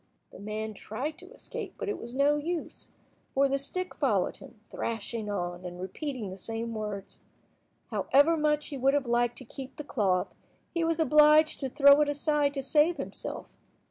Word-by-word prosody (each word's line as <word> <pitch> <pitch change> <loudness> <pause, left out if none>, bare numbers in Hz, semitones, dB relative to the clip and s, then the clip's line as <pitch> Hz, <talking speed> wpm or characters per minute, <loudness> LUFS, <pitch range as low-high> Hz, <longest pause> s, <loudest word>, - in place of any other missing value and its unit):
The - - -12
man 215 +1 -4
tried 255 +10 -5
to - - -13
escape, - - -7
but - - -4
it 415 - -2
was 235 +2 -8
no 285 +2 +4
use, 325 +3 -4 0.4
for 275 +1 +4
the 275 0 0
stick 365 +7 -4
followed - - +1
him, - - -14
thrashing 225 -1 -4
on, 175 -3 -3
and 180 0 -7
repeating 215 - -4
the 190 - -8
same 225 +3 -4
words. 210 -3 -5 0.7
However 285 +5 +4
much 300 -1 +1
he 280 - -5
would 270 +2 +3
have 285 -2 +1
liked 240 0 +1
to 260 - -9
keep 265 +3 -9
the 300 - -6
cloth, 195 -10 0 0.4
he 335 - 0
was 330 0 0
obliged 305 0 +5
to 270 - -2
throw 280 +2 +7
it 295 - +2
aside 290 0 +1
to 275 - -2
save 305 +5 +3
himself. - - -6
275 Hz, 180 wpm, -29 LUFS, 220-300 Hz, 0.7 s, throw